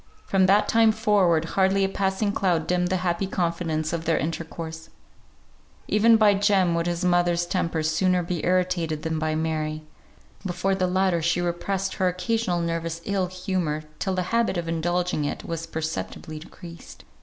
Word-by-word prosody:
From 190 -1 +3
that 200 +2 +4
time 225 -1 +4
forward, 200 -7 +2
hardly 190 +3 +2
a - - +3
passing 195 +1 -1
cloud 175 -5 0
dimmed 180 0 +1
the 185 +1 0
happy 175 +2 0
confidence 165 -4 -1
of 165 -1 -3
their 165 -1 +2
intercourse; 160 +1 -5 1.0
even 225 +2 +5
by 210 -2 +5
Jem 195 -3 +2
would 170 0 0
his 175 +1 -1
mother's 175 -1 +2
temper 170 -3 -1
sooner 180 +3 +2
be 170 -1 -3
irritated 180 -4 0
than 160 -1 -2
by 155 0 -1
Mary; 155 -1 -2 0.6
before 190 +1 -1
the 185 -1 +1
latter 185 -2 +1
she 170 +2 +1
repressed 185 +3 -2
her 185 - +2
occasional 180 0 -1
nervous 165 0 -2
ill 195 -3 0
humour 180 -4 -2 0.2
till 190 -1 -1
the 185 - 0
habit 230 -5 +2
of 170 -1 -3
indulging 175 0 -1
it 145 - -3
was 165 0 -4
perceptibly 155 -1 -5
decreased. 170 +1 -12
175 Hz, 165 wpm, -25 LUFS, 165-190 Hz, 1.0 s, even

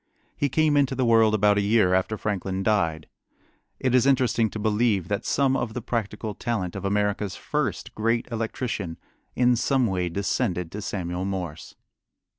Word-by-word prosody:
He 145 - 0
came 155 +2 +2
into 135 -2 +2
the 130 -1 +1
world 115 -2 +5
about 105 -1 +3
a - - +2
year 100 -2 +3
after 95 +4 +1
Franklin 95 -2 -2
died. 85 -8 0 0.7
It 130 -2 0
is 125 +1 +4
interesting 125 -4 +2
to - - -7
believe 105 -3 +1
that 105 +2 -2
some 135 -1 +2
of 115 -4 -2
the 125 - -3
practical 110 -2 -3
talent 100 -5 -3
of 100 - -5
America's 100 -1 0
first - - -3
great 115 +2 0
electrician 110 -6 -3 0.4
in 125 0 +4
some 130 +2 +2
way 90 -4 -1
descended 90 -2 -1
to 105 - -6
Samuel 90 -2 -3
Morse. 90 -5 -5
105 Hz, 165 wpm, -25 LUFS, 95-120 Hz, 0.7 s, world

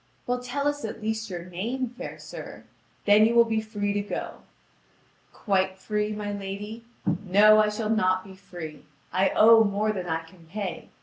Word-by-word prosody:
"Well, 245 0 -1
tell 275 +3 -2
us 290 0 -1
at 220 0 -5
least 220 0 -3
your 175 -2 -6
name, 225 +9 -3
fair 245 - -8
sir; - - -9 0.4
then 210 +1 +6
you 235 - 0
will 235 0 +7
be 220 -1 0
free 205 -2 -2
to 205 - 0
go." 205 - -5 0.9
"Quite 190 -2 0
free, 210 +2 -2
my 210 -1 -4
lady? 205 +3 -6 0.4
No, 210 +3 +6
I 215 0 +4
shall 215 +1 -2
not 185 -4 +2
be 195 - -12
free. 175 -5 -9 0.3
I 190 +1 +3
owe 225 +1 +8
more 210 +1 +1
than 185 -4 -4
I 165 -1 -1
can 165 0 -18
pay. 195 +1 -5
210 Hz, 180 wpm, -26 LUFS, 190-220 Hz, 0.9 s, owe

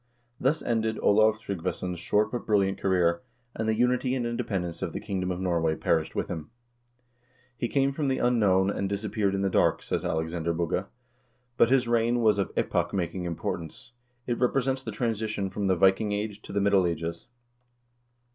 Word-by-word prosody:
2 - - -11
Thus 150 +4 +2
ended 110 -1 0
Olav 110 +1 +4
Tryggvason's 90 -3 -4
short 105 +4 +1
but 120 - -4
brilliant 100 -2 +2
career, 90 -3 +2 0.3
and 110 0 -2
the 110 - +2
unity 125 +2 +1
and 125 -2 -1
independence 95 -7 -3
of - - -3
the - - -3
kingdom 95 -2 -3
of 90 -1 -2
Norway 85 -4 +1
perished 80 -1 0
with - - -1
himi 80 -3 -5 0.6
" 125 +1 -38
He 120 - 0
came 135 +2 +2
from 145 +1 -2
the 130 -1 +1
unknown, 100 -6 +3
and 100 -1 -2
disappeared 100 -1 -1
in 95 - -1
the - - +2
dark," - - +2
says - - -2
Alexander 80 +1 -1
Bugge, 85 +2 -1 0.7
"but 115 - +4
his 130 -2 +3
reign 120 +1 +2
was 105 -3 +3
of 100 - -1
epoch - - 0
making 90 0 -2
importance. 85 +4 -5 0.3
It 120 -1 -2
represents 130 +1 +1
the 115 - -5
transition 110 -3 -2
from 100 0 -2
the 95 - +3
Viking 95 +3 +3
Age 105 0 -3
to - - -10
the 100 0 0
Middle 100 -2 +4
Ages." 85 +4 -4
100 Hz, 185 wpm, -27 LUFS, 90-120 Hz, 0.7 s, Olav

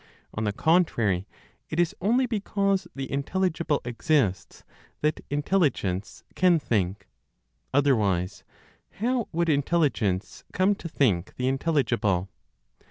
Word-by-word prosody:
On 110 - -2
the 105 - +1
contrary, 115 - +2 0.4
it 155 - -3
is 175 +3 +2
only 240 +7 +3
because 200 -4 0
the 135 -1 -5
intelligible 165 +1 0
exists, 120 - 0 0.4
that 150 0 0
Intelligence 145 - 0
can 180 -2 +4
think. 100 - -1 0.6
Otherwise, 105 -9 +1 0.5
how 240 +2 -1
would 170 +1 0
Intelligence 140 - 0
come 190 +2 +3
to 170 -4 -7
think 100 - +1
the 125 - -1
intelligible? 125 - +1
145 Hz, 105 wpm, -26 LUFS, 105-175 Hz, 0.6 s, can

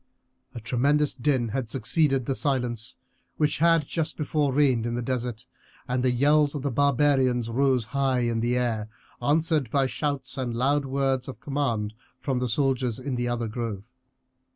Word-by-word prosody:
A - - -4
tremendous 140 +6 +1
din 130 -2 0
had 120 0 -3
succeeded 135 +2 +1
the 135 - 0
silence 125 -4 -2 0.4
which 150 -2 +1
had 165 -2 +4
just 160 +1 -3
before 150 -2 0
reigned 130 -4 +2
in 120 - -2
the 120 - -2
desert, 125 -1 -3 0.4
and 125 0 0
the 130 - +2
yells 145 +4 +3
of 140 - -4
the 140 - -1
barbarians 130 -3 +2
rose 130 -1 +2
high 135 -2 +1
in 120 -1 0
the 120 +2 +1
air, 110 -3 -1 0.3
answered 155 0 +1
by 135 +3 +2
shouts 135 +2 -3
and 120 -3 -2
loud 140 +4 +1
words 135 -1 0
of 130 -5 -8
command 125 -6 -2 0.3
from 130 -3 -1
the 125 -1 -1
soldiers 130 -2 +1
in 130 +1 -4
the 120 0 -1
other 120 -1 -1
grove. 115 -1 -5
130 Hz, 170 wpm, -26 LUFS, 120-140 Hz, 0.4 s, had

